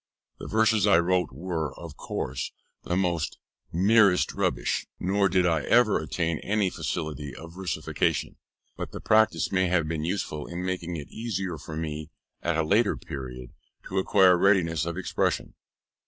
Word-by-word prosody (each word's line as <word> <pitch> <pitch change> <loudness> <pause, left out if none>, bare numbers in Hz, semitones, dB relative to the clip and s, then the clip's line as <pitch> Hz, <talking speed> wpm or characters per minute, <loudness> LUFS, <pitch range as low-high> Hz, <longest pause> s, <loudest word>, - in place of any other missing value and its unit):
The - - -7
verses 110 -1 +3
I 95 - +6
wrote 90 +1 +1
were, 80 +1 -3
of - - -9
course, 65 0 -4 0.3
the 90 - -1 0.7
merest 100 +1 +4
rubbish, - - -1
nor 100 +2 +2
did 90 0 +3
I 80 -3 +2
ever 120 -4 +4
attain 80 0 -2
any 100 -2 0
facility 75 -4 -4
of 85 +1 -10
versification, 95 -1 -1 0.4
but - - -6
the - - -5
practice 110 0 +3
may 95 -1 +2
have 85 -3 +1
been 80 -1 -2
useful 80 -4 -3
in 90 +1 -5
making 90 -2 -3
it 75 -3 -7
easier 95 -7 -3
for 80 - -8
me, 75 -2 -4 0.3
at 85 -1 0
a 80 - +2
later 105 +7 +2
period, 65 -7 -8 0.4
to 95 - 0
acquire 95 -1 +5
readiness 85 -5 +3
of 85 +1 -3
expression. 95 - -1
90 Hz, 155 wpm, -27 LUFS, 80-95 Hz, 0.7 s, I